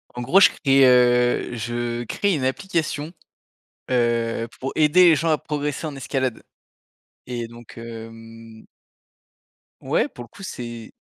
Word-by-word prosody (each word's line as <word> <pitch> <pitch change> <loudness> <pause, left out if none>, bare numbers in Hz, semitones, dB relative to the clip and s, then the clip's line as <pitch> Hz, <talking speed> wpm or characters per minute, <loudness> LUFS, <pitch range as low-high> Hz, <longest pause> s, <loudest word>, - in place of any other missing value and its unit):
En 125 - -4
gros, 165 +11 +4
je - - +8
crée, 135 -2 +3
heu, 125 -1 +3
je 120 +1 -3
crée 200 - 0
une 145 -6 -2
application, 160 0 -2 0.8
heu, 115 -2 0
pour 135 - -3
aider 155 +4 +5
les 160 - +5
gens 165 +3 0
à 155 - +2
progresser 150 0 -3
en 145 -3 -6
escalade 130 -2 -2 0.8
et 120 -2 -5
donc, 120 0 -13
hem 115 -1 -11 1.2
Ouais, - - 0
pour 120 - -11
le - - -14
coup, 200 - -15
c'est 120 -9 -7
125 Hz, 140 wpm, -22 LUFS, 115-150 Hz, 1.2 s, je